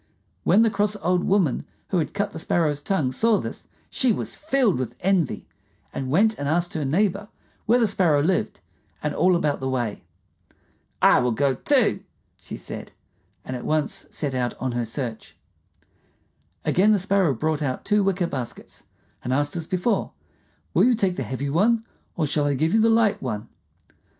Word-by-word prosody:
When 205 +6 +5
the 225 - +2
cross 210 0 +1
old 180 -2 0
woman 190 -9 +2 0.3
who 185 - +1
had 160 - -3
cut 205 0 -1
the - - -7
Sparrow's 155 -3 0
tongue 150 -6 0
saw 220 - +2
this, - - -6 0.2
she 255 -2 +2
was - - -2
filled 270 - +1
with 120 -2 -4
envy, 180 -6 0 0.5
and 130 -1 -4
went 215 +9 +3
and 145 - -2
asked 175 +2 0
her 155 - -2
neighbor 195 +7 0 0.4
where 235 +3 +5
the 240 - +3
Sparrow 175 -8 +2
lived 185 +3 0 0.4
and 150 -1 -1
all 185 0 +3
about 150 -4 0
the 130 - -2
way. 120 -5 -2 1.0
"I - - +7
will 125 0 +1
go, 135 +3 +1
too," - - +2 0.4
she - - -7
said, - - -8 0.5
and 130 - -4
at 125 - -6
once 155 -1 -1
set 145 -3 -3
out 125 -1 -1
on 130 0 -2
her 120 -1 -2
search. 115 -1 -6 1.3
Again 205 +4 +4
the - - +4
Sparrow 195 -6 +2
brought 155 +4 -1
out 130 -3 -3
two 210 -1 +3
wicker 190 -2 +1
baskets, 130 -7 -7 0.4
and 125 - -3
asked 145 +4 0
as 165 -2 -4
before, 185 +6 0 0.6
"Will - - +4
you 250 -1 +4
take 195 -5 0
the - - -4
heavy 140 +2 -3
one, 225 +8 +2 0.3
or 160 - +1
shall 145 0 0
I 145 -1 +1
give 160 +5 +1
you 220 - +4
the 225 - +4
light 225 -2 +3
one?" 110 -3 -4
165 Hz, 180 wpm, -24 LUFS, 135-200 Hz, 1.3 s, I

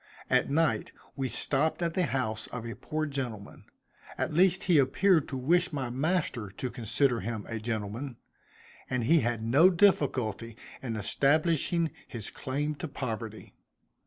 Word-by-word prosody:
At - - +3
night 160 +3 +1 0.2
we 135 -2 -2
stopped 155 +7 0
at 170 -1 0
the 180 -1 +1
house 110 -5 -2
of 120 -2 -6
a 115 - -5
poor 155 0 -3
gentleman, 125 -8 -5 0.5
at - - -1
least 180 +3 +4
he 170 -5 +4
appeared 160 +5 +3
to 135 - -4
wish 175 +8 +2
my 135 -5 -3
master 140 - -1
to 125 +6 -5
consider 120 +1 +1
him 110 -3 -4
a 115 -1 -4
gentleman; 115 +3 -4 0.7
and 125 -2 0
he 160 +8 +5
had 115 -2 -1
no 140 +11 +6
difficulty 130 - +1 0.2
in 120 -4 -3
establishing 155 - +1 0.2
his 115 -3 -6
claim 145 +3 -2
to 165 - -4
poverty. 115 -6 -6
135 Hz, 150 wpm, -29 LUFS, 115-160 Hz, 0.7 s, no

